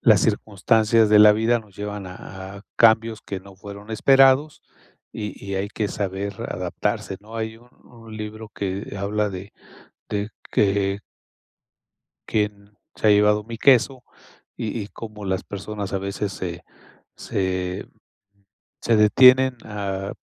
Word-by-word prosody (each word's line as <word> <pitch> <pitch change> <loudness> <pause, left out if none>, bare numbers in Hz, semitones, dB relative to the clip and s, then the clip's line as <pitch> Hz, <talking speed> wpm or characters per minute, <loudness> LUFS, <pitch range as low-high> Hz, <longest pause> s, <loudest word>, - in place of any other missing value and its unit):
las - - +5
circunstancias 110 +2 +2
de 105 0 +7
la 105 0 +9
vida 115 +3 +2
nos 105 -3 -20
llevan 105 -1 -5
a 95 +1 -9
a 100 - -12
cambios 115 -1 +4
que 100 - -5
no 95 +1 -15
fueron 100 +2 -11
esperados 135 +5 +4 0.5
y 105 -2 -5
y 100 - -3
hay 95 +1 -2
que 110 0 -2
saber 100 0 -3
adaptarse, 95 - -3
¿no? 110 +2 -10
Hay 110 0 -4
un 120 +2 -20 0.2
un 115 -2 -12
libro 110 0 -7
que 100 +1 -4
habla 105 +1 0
de 95 +2 -8 0.6
de 105 0 -2 0.2
que 100 0 +1 1.3
¿Quién 105 -1 -2 0.2
se 110 - +2
ha - - +7
llevado 105 0 +4
mi 115 0 -8
queso?, 130 0 +4 0.5
y 110 +1 -3
y 100 - -8
cómo 110 -1 -9
las 95 -1 -1
personas 100 0 -6
a 100 - 0
veces 100 +1 -3
se 90 -2 -5 0.5
se 95 -1 -3 0.9
se 115 - +3
detienen 125 +5 +6
a 100 -2 -4
105 Hz, 140 wpm, -23 LUFS, 100-110 Hz, 1.3 s, la